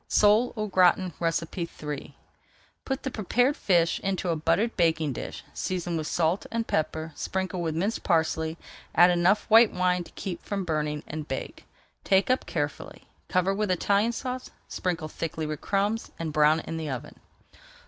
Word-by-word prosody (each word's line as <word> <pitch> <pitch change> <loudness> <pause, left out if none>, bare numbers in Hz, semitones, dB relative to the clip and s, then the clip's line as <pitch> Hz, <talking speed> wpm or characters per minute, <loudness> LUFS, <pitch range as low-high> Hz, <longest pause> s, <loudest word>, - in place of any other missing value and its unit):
SOLE 215 +4 +4
AU 215 - -1
GRATIN 185 -2 +3
III 165 -3 -3 0.7
Put 265 -1 -3
the 265 - -3
prepared 245 +6 +1
fish 170 -3 +2
into 190 -2 -2
a 165 - +2
buttered 165 +9 +1
baking 160 -4 +2
dish, - - -6
season 175 -2 -2
with 155 -1 -2
salt 170 +4 0
and 230 0 -2
pepper, 160 -1 -1
sprinkle 190 -1 -3
with 160 -2 -2
minced 200 +7 -1
parsley, 160 -1 +1 0.4
add 175 +1 +7
enough 180 +4 +3
white 225 0 +7
wine 180 -1 +1
to - - -15
keep 180 -3 -5
from 195 -2 -3
burning, 150 -2 -1
and 155 0 -6
bake. 135 - -6 0.4
Take 195 +5 +3
up 255 - 0
carefully, 145 -3 -4 0.2
cover 185 +1 +2
with 210 0 -1
Italian 200 +5 +2
Sauce, 255 +1 -5 0.2
sprinkle 170 -4 -2
thickly 160 0 -4
with 150 -1 -4
crumbs, 205 +3 0
and 160 -2 -4
brown 150 +2 +4
in 165 - -5
the 160 -2 -4
oven. 135 +2 -6
175 Hz, 160 wpm, -27 LUFS, 160-200 Hz, 0.7 s, add